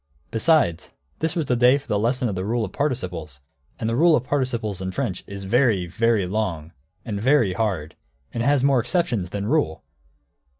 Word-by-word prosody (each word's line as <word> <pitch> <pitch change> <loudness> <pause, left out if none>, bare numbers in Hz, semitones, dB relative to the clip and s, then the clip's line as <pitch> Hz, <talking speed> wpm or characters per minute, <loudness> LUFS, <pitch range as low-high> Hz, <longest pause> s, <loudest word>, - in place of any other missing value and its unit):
Besides, 115 - +2 0.3
this 160 +2 -1
was 165 -3 0
the 125 - +1
day 125 +3 +5
for 145 0 -12
the 105 -3 0
lesson 125 +3 0
in 105 - -2
the 95 0 -3
rule 115 +3 0
of - - -8
participles; 90 - -3 0.4
and 110 - -2
the 115 - 0
rule 165 +4 +5
of 125 - 0
participles 120 -8 -2
in 95 - -3
French 90 0 -3
is 100 0 -7
very, 105 -2 +2
very 110 +3 +1
long, 90 -5 -3 0.3
and 100 -3 -3
very 125 -6 +3
hard, 90 -7 -2 0.4
and 115 - -2
it - - -1
has 140 -2 +3
more 135 -2 +4
exceptions 120 - 0
than 100 +1 -4
rule. 130 - 0
115 Hz, 195 wpm, -23 LUFS, 95-130 Hz, 0.4 s, day